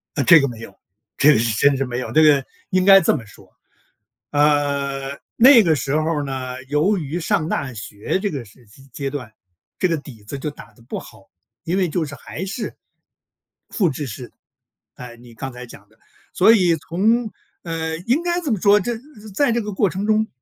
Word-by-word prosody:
呃， 140 - +1
这 165 +5 +8
个 140 - 0
没 115 -2 -9
有， 100 -4 -10 0.4
这 150 +2 +6
个 - - +3
是 115 0 0
真 140 +4 +4
是 135 - -1
没 120 -1 -4
有。 125 - -5
这 155 - +5
个 145 -3 +5 0.3
应 185 0 +2
该 195 0 +8
这 170 - +2
么 120 -6 -9
说， 100 - -17 0.8
呃， 140 -2 0 0.2
那 250 0 +8
个 165 -5 +3
时 135 +1 -1
候 155 -1 0
呢， 130 -2 -5
由 150 +10 +1
于 155 +1 -4
上 180 -2 0
大 135 -6 -2
学 105 - -4
这 205 0 -1
个 140 -5 -5
时 115 +3 -20
期 135 +6 -19
阶 140 +1 -4
段， 130 -6 -7 0.5
这 185 - +2
个 165 - 0
底 135 -7 -11
子 105 +7 -7
就 150 +2 -4
打 115 -6 -14
得 110 - -22
不 115 - -6
好， - - -16 0.4
因 175 - -1
为 185 -2 +1
就 165 +1 -1
是 145 -1 -8
还 160 +4 -7
是 205 +3 -5 0.9
复 185 -7 +1
制 145 +1 -5
式， 120 +1 -8 0.6
哎， 125 -1 -10
你 120 0 -16
刚 130 +4 -6
才 125 0 -9
讲 100 -3 -15
的。 110 +1 -29 0.3
所 195 +5 +5
以 180 -7 +3
从， 215 +9 0 0.3
呃， 160 -1 -3
应 265 +8 +2
该 350 0 -1
这 300 -8 -2
么 210 - -1
说， 205 +2 +5
这 240 +5 -2
呃 225 - -6 0.3
在 285 +4 +2
这 235 0 +1
个 210 -1 -5
过 195 0 +1
程 195 +2 -4
中， 220 0 +2
150 Hz, 225 characters per minute, -21 LUFS, 130-190 Hz, 0.9 s, 这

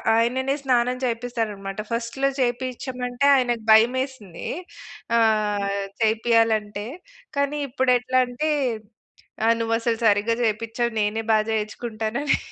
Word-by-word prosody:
ఆయననే 260 +4 +1
స్నానం 250 -1 +2
చేపిస్తారన్నమాట. 225 -5 -3
ఫస్ట్‌లో 235 +4 -1
చేపించమంటే 250 0 -2
ఆయనకు 240 -3 0
భయమేసింది. 230 -4 +2 0.7
ఆహ్, 210 -3 +1 0.2
చేపీయాలంటే. 220 -2 +2 0.5
కానీ 280 +1 0
ఇప్పుడెట్లా 255 -1 +2
అంటే, 245 +6 -2 1.0
ఆహ్ 230 +1 +5
"నువ్వసలు 230 0 0
సరిగ్గా 210 +2 +3
చేపించవు. 230 +2 -1
నేనే 210 +2 0
బాగా 215 0 +2
చేయించుకుంటానని" 220 +4 -1
230 Hz, 90 wpm, -23 LUFS, 215-250 Hz, 1.0 s, ఆహ్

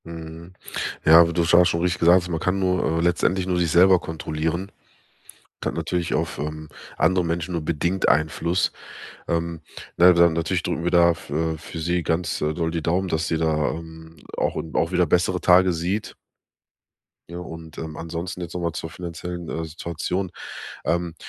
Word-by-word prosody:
Mhm, 85 +1 -9 0.5
ja, 80 +1 +9
aber 85 0 +3
du 85 - +1
hast 90 +1 +6
schon 85 +1 -1
richtig 90 0 0
gesagt, 85 +1 +5
man 80 -2 -2
kann 90 +4 0
nur 90 -3 +1
äh, - - +1
letztendlich 90 +2 +1
nur 90 -1 +1
sich 85 -2 +1
selber 90 +2 +6
kontrollieren, 80 +3 -3 0.7
und - - -13
hat - - -1
natürlich 90 -2 -2
auf, 85 +3 -1
ähm, 75 +1 -5 0.3
andere 90 -1 +3
Menschen 85 +2 -2
nur 85 -2 -2
bedingt 85 +4 0
Einfluss, 80 +6 +1 0.6
ähm, 85 -1 -2 0.4
ne, 90 +1 +7
dann, 85 -1 +5
natürlich 85 +3 -1
drücken 85 -1 -2
wir 85 - 0
da 85 -1 +5
f 85 -3 -6
äh, 80 +2 -1
für 80 +2 -9
sie 85 +2 0
ganz, 80 +2 -1
äh, 75 0 0
doll 80 0 -2
die 85 -1 -2
Daumen, 90 +4 0
dass 80 -1 -1
sie, 80 - 0
da, 80 -2 0
hm, 80 0 -12 0.2
auch, - - -1
hm, 80 - -5
auch 85 - +1
wieder 90 -1 +2
bessere 90 +3 +1
Tage 90 0 +5
sieht. 90 +6 -2 1.2
Ja, 85 - -7
und, 80 -2 -9
ähm, 80 -1 -6
ansonsten 85 +3 -5
jetzt 85 -1 -6
noch 90 - -2
mal 85 -2 -1
zur 80 - -5
finanziellen, 85 +1 -6
äh, 80 - -3
Situation, 85 +3 -4 0.5
ähm, 85 0 -1
85 Hz, 185 wpm, -23 LUFS, 80-90 Hz, 1.2 s, ja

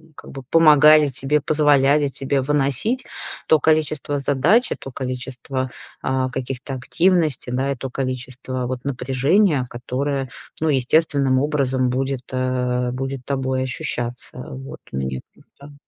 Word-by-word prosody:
как - - -12
бы 135 - -8
помогали 155 -2 +7
тебе, 140 +2 0
позволяли 145 -1 +3
тебе 135 0 -1
выносить 145 - 0 0.4
то 155 - +5
количество 155 -2 +1
задач, 145 - +2
и - - 0
то 135 - -10
количество, 130 0 -4 0.3
а, 130 0 0
каких-то 130 +1 -5
активностей, 160 -1 +1
да, 130 +2 0
и - - -1
то 135 +1 -6
количество 130 -1 -4
вот 125 0 -4
напряжения, 135 +4 +2
которое, 135 +2 -3 0.3
ну, 160 - +2
естественным 135 -1 +2
образом 135 -3 +1
будет, 135 +1 -1
а, 125 -1 -1
будет 135 0 -4
тобой 130 -1 -1
ощущаться. 125 -1 -3 0.2
Вот 135 +1 -8
у - - -4
меня 65 -1 -3
просто. 145 +1 -17
135 Hz, 130 wpm, -21 LUFS, 130-145 Hz, 0.4 s, помогали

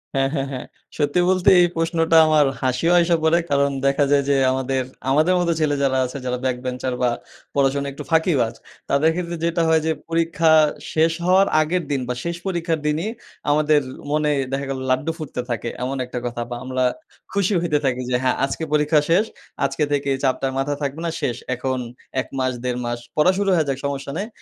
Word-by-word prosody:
হ্যাঁ, 135 0 +2
হ্যাঁ, 135 -1 -1
হ্যাঁ। 130 -2 -5 0.3
সত্যি 145 +3 +1
বলতে, 185 -1 +4
এই 175 - +5
প্রশ্নটা 165 0 +2
আমার 155 -2 +4 0.2
হাসিও 130 +6 +1
আইসা 170 0 +3
পড়ে। 160 +2 +4
কারণ, 140 0 +2
দেখা 140 +1 +3
যায় 140 -1 +4
যে 140 - +4 0.2
আমাদের 130 0 -1 0.3
আমাদের 155 +6 +3
মতো 175 -1 +1
ছেলে 150 -2 +1
যারা 130 -1 +2
আছে, 125 - -6
যারা 125 0 -1
back 130 -1 0
bencher 125 0 -2
বা, 125 - +3 0.5
পড়াশোনা 140 0 +1
একটু - - -8
ফাঁকিবাজ। 155 -8 +2 0.4
তাদের 145 +3 +3
ক্ষেত্রে 175 -1 -3
যেটা 170 0 +1
হয় 160 -1 +4
যে 160 - +2 0.2
পরীক্ষা 165 -1 +2 0.4
শেষ 160 +1 +3
হওয়ার 190 +2 +5
আগের 170 +3 0
দিন 140 -2 0
বা, 125 - -1
শেষ 170 0 -2
পরীক্ষার 170 -3 -1
দিনই 160 +8 0 0.4
আমাদের 150 0 +3 0.3
মনে 150 0 +2 0.2
দেখা 140 +1 -2
গেলো 135 -1 -3
লাড্ডু 130 +6 +1
ফুটতে 155 -6 -5
থাকে, 120 0 -2
এমন 135 +2 -2
একটা 125 0 -5
কথা। 120 0 -3
বা, 120 - -4
আমরা 130 0 -1 0.5
খুশি 200 0 +1
হইতে 160 -4 +1
থাকি 130 -1 0
যে, 125 - +1
হ্যাঁ, 130 - +2
আজকে 140 - -4
পরীক্ষা 150 0 +4
শেষ। 190 +6 +4 0.4
আজকে 140 +3 -1
থেকে 140 -1 0
চাপটা 130 0 +1
মাথা 145 +2 0
থাকবে 140 +3 -3
না, 165 - -1
শেষ। 120 - -1 0.2
এখন 130 +1 -2 0.4
১ - - -10
মাস, 130 0 0
১.৫ 125 -1 -2
মাস 120 0 -3 0.2
পড়া 155 +5 +5
শুরু 200 -1 +1
হয়ে 160 -3 +2
যাক, 135 - -1
সমস্যা 140 0 -3
নেই। 205 +4 -3
145 Hz, 195 wpm, -22 LUFS, 130-165 Hz, 0.5 s, এই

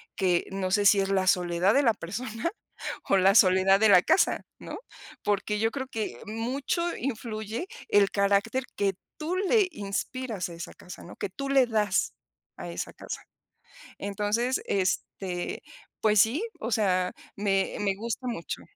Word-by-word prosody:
que 180 -3 +2
no 195 -1 -2
sé 205 +1 +3
si 200 0 +7
es 195 0 0
la 190 -1 +2
soledad 180 +2 +3
de 280 - +4
la 230 -4 +4
persona, 220 - -4 0.6
o 195 - +5
la 190 +1 +5
soledad 190 -1 +6
de 220 0 +5
la 180 -2 +7
casa, - - +3 0.2
¿no? - - -7 0.5
Porque 205 +1 0
yo 225 +1 +2
creo 265 0 -4
que 215 - -4
mucho 265 +10 -2
influye 225 - -4 0.2
el 200 -1 +4
carácter 200 +5 +1
que 200 -1 +1 0.2
tú 320 +4 -2
le 395 +2 +3
inspiras 215 - -3
a - - -8
esa 170 0 -8
casa, 180 - -11
¿no?, - - -11
que - - -3
tú 275 +8 -5
le 270 -2 +5
das 210 -4 +1 0.4
a - - -6
esa - - -5
casa. - - -7 0.8
Entonces, 210 +6 0
este, 185 -1 -2 0.4
pues 215 -1 +4
sí, 245 - +1 0.2
o 225 - -4
sea, 185 -4 +2 0.2
me 195 -1 0
me 200 -2 +1
gusta 235 +4 -4
mucho. 230 -9 -4
210 Hz, 160 wpm, -27 LUFS, 195-235 Hz, 0.8 s, si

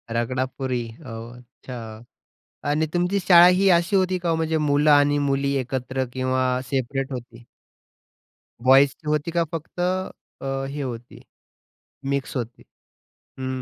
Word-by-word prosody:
रगडापुरी 130 +1 -2 0.2
ओह! 115 0 -8
अच्छा 120 -2 -10 0.7
आणि 155 +2 +1
तुमची 180 +3 +1
शाळा 175 -1 +7
ही 185 +2 +4
अशी 170 +3 +3
होती 185 -1 +1
का 175 -1 -3
हो? 165 - +2
म्हणजे 160 0 0
मुलं 150 0 +3
आणि 145 0 +5
मुली 140 0 +1
एकत्र 130 0 -2
किंवा 130 0 0
सेपरेट 135 +1 -2
होती? 120 -1 -8 1.2
बॉयीज 135 +2 +6
ची 155 - -15
होती 150 +2 0
का? 170 0 +2
फक्त 165 +2 -7 0.6
अ, 135 0 -3
हे 145 +1 -5
होती, 120 -2 -7 0.9
मिक्स 140 0 -2
होती? 120 -1 -6 0.8
हं, 130 0 -3
135 Hz, 130 wpm, -23 LUFS, 130-160 Hz, 1.2 s, शाळा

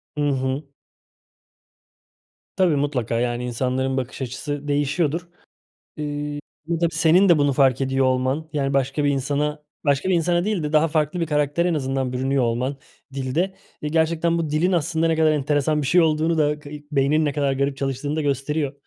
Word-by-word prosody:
Hı 145 -1 +1
hı. 130 +1 -1 1.9
Tabii, 180 -5 +3
mutlaka. 130 -5 -1
Yani, 120 0 -1
insanların 130 +2 -1
bakış 130 +1 -4
açısı 145 +3 -4
değişiyordur. 145 +4 0 0.7
Eee, 145 -1 -4 0.4
tabii 170 -1 +1
senin 170 +4 +4
de 170 - +6
bunu 145 -1 +3
fark 135 -1 +3
ediyor 135 0 +1
olman, 130 +5 0
yani, 140 -2 -1
başka 135 +2 0
bir 145 - +3
insana, 145 +2 -1 0.2
başka 140 +5 +2
bir 190 - +3
insana 175 +1 +1
değil 205 -5 -1
de 150 +1 -3
daha 155 +1 +4
farklı 155 +2 0
bir 165 - 0
karaktere 150 +3 +1
en 170 - +1
azından 135 -2 -1
bürünüyor 130 +1 0
olman 125 +4 -1 0.4
dilde, 145 +8 -1 0.3
eee, 150 - -2
gerçekten 165 +1 +1
bu 160 -3 -2
dilin 170 +5 +1
aslında 165 0 +1
ne 165 -1 +2
kadar 155 -1 +4
enteresan 150 +1 +1
bir 135 - -2
şey 175 +6 +4
olduğunu 160 0 +2
da, 150 0 +2
kayık 150 0 -11
beyninin 145 +3 +2
ne 145 - 0
kadar 140 -1 0
garip 140 +1 -1
çalıştığını 135 +2 -2
da 155 - 0
gösteriyor. 140 +1 -1
145 Hz, 175 wpm, -22 LUFS, 135-160 Hz, 1.9 s, de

